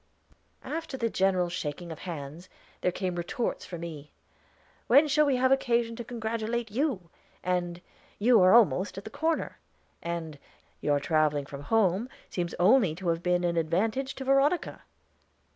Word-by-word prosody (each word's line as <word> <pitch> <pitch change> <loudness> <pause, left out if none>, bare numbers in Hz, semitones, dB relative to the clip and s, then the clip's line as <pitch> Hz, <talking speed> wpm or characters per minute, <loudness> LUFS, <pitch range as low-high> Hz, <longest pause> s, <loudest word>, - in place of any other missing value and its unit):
After 320 -3 -4
the 230 -3 -1
general 185 -2 +2
shaking 170 -1 -5
of 160 - -8
hands, 165 0 -7 0.3
there 180 - +1
came 185 0 -3
retorts 175 +7 -3
for 175 - -7
me. 155 -3 -8 0.8
"When 280 +5 +6
shall 300 +1 +3
we 275 - +3
have 260 +1 +2
occasion 235 -3 +2
to 235 - -6
congratulate 230 0 -3
you?" 220 - -1 0.3
And, 175 -1 -1 0.4
"You 225 0 +5
are 185 0 +6
almost 205 -4 +4
at 195 - -6
the 220 - -9
corner." 320 +4 -1 0.4
And, 165 -3 -5 0.4
"Your 145 -1 +2
traveling 150 -1 +1
from 140 0 -8
home 215 - +2 0.2
seems 175 -1 -3
only 190 -2 +4
to 180 0 -3
have 165 0 0
been 180 0 +1
an 170 -1 0
advantage 215 +12 0
to 270 - -6
Veronica." 275 +6 +2
185 Hz, 155 wpm, -28 LUFS, 170-240 Hz, 0.8 s, When